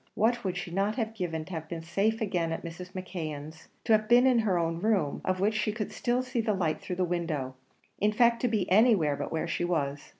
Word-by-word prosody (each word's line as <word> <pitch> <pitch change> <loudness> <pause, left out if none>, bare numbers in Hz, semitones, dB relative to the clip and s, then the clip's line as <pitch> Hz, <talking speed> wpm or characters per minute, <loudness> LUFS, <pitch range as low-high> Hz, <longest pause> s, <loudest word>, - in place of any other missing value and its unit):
What 235 +3 +2
would 185 -2 -2
she 180 -1 -5
not 200 +4 0
have 225 -3 -2
given 165 -6 -3
to 185 - -12
have 160 -1 -5
been 165 -1 -5
safe 200 +7 0
again 180 -6 0
at 165 - -4
Mrs. 180 +2 -8
McKeon's; 160 -5 -6 0.2
to - - -1
have 215 0 +3
been 245 +1 +6
in 255 -3 +5
her 205 -5 +1
own 165 -1 -1
room, 195 -7 +1
of 185 0 0
which 205 +3 +2
she 215 0 0
could 210 -1 -4
still 245 +1 0
see 255 -2 -1
the 215 -2 0
light 165 -5 -1
through 180 - -4
the 185 - 0
window; 165 -7 -2 0.5
in 210 +1 +3
fact, 235 +1 +3
to 250 - +2
be 215 -5 0
anywhere 195 - +5
but 140 - -5
where 160 +1 -1
she 170 - -2
was? 145 -5 -2
185 Hz, 240 wpm, -29 LUFS, 165-220 Hz, 0.5 s, been